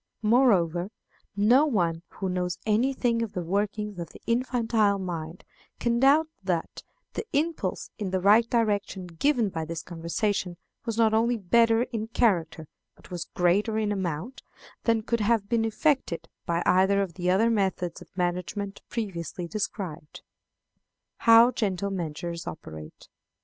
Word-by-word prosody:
Moreover, 195 Hz, -7 st, +3 dB, 0.5 s
no 240 Hz, +9 st, +5 dB
one 170 Hz, -, 0 dB
who 195 Hz, -, -5 dB
knows 180 Hz, -1 st, -2 dB
any 220 Hz, +5 st, +2 dB
thing 240 Hz, -3 st, 0 dB
of 230 Hz, -3 st, -3 dB
the 180 Hz, -, -3 dB
workings 205 Hz, +2 st, -2 dB
of 170 Hz, -, -5 dB
the -, -, -14 dB
infantile 230 Hz, -4 st, +1 dB
mind 170 Hz, -3 st, -5 dB, 0.4 s
can 235 Hz, 0 st, +1 dB
doubt 285 Hz, +5 st, +5 dB, 0.2 s
that 175 Hz, -3 st, -2 dB, 0.3 s
the -, -, -3 dB
impulse 290 Hz, -, -1 dB
in 205 Hz, -3 st, -2 dB
the 190 Hz, 0 st, 0 dB
right 215 Hz, +5 st, +5 dB
direction 205 Hz, -5 st, 0 dB
given 225 Hz, -, +1 dB
by 165 Hz, -3 st, -4 dB
this 165 Hz, +1 st, -5 dB
conversation 175 Hz, +2 st, -2 dB, 0.3 s
was 230 Hz, -1 st, -3 dB
not 225 Hz, -1 st, +4 dB
only 230 Hz, +2 st, +2 dB
better 230 Hz, +4 st, +3 dB
in 225 Hz, -3 st, -4 dB
character, 175 Hz, -9 st, 0 dB, 0.3 s
but -, -, -19 dB
was 175 Hz, -2 st, -5 dB
greater 200 Hz, +5 st, +2 dB
in 215 Hz, -1 st, 0 dB
amount, 190 Hz, -, -3 dB, 0.4 s
than 230 Hz, -2 st, +2 dB
could 235 Hz, +1 st, 0 dB
have 215 Hz, -1 st, +1 dB
been 225 Hz, 0 st, +1 dB
effected 225 Hz, -, 0 dB, 0.2 s
by 170 Hz, 0 st, 0 dB
either 190 Hz, +2 st, +4 dB
of 180 Hz, -4 st, -6 dB
the 180 Hz, 0 st, -2 dB
other 215 Hz, +5 st, +3 dB
methods 190 Hz, -5 st, -1 dB
of -, -, -13 dB
management 180 Hz, +3 st, -2 dB
previously 180 Hz, -6 st, -4 dB
described. 185 Hz, -6 st, -5 dB, 0.9 s
How 230 Hz, +1 st, +7 dB
Gentle 200 Hz, -4 st, -1 dB
Measures 170 Hz, -1 st, -4 dB
operate. 80 Hz, -, -9 dB
200 Hz, 145 wpm, -27 LUFS, 175-230 Hz, 0.9 s, How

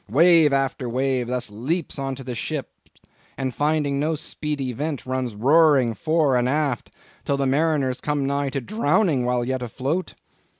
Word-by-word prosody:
Wave 160 Hz, -, +5 dB
after 135 Hz, -2 st, -1 dB
wave 130 Hz, 0 st, 0 dB
thus 125 Hz, -3 st, -2 dB
leaps 140 Hz, -, -3 dB
into 135 Hz, -1 st, -4 dB
the 125 Hz, -1 st, -5 dB
ship, 140 Hz, +4 st, -4 dB, 0.7 s
and 130 Hz, -2 st, -2 dB
finding 145 Hz, -1 st, 0 dB
no 155 Hz, +2 st, 0 dB
speedy 145 Hz, -3 st, -4 dB
vent 145 Hz, +2 st, -4 dB
runs 130 Hz, -3 st, -3 dB
roaring 135 Hz, 0 st, +4 dB
fore 155 Hz, -1 st, +1 dB
and 125 Hz, 0 st, +2 dB
aft, 140 Hz, -4 st, -1 dB, 0.3 s
till 140 Hz, -, 0 dB
the 140 Hz, -, 0 dB
mariners 140 Hz, -2 st, +1 dB
come 145 Hz, -2 st, -1 dB
nigh 140 Hz, 0 st, 0 dB
to 135 Hz, 0 st, -3 dB
drowning 190 Hz, -, +1 dB
while 125 Hz, -1 st, 0 dB
yet 130 Hz, 0 st, -2 dB
afloat. 135 Hz, +9 st, -3 dB
135 Hz, 160 wpm, -23 LUFS, 125-150 Hz, 0.7 s, Wave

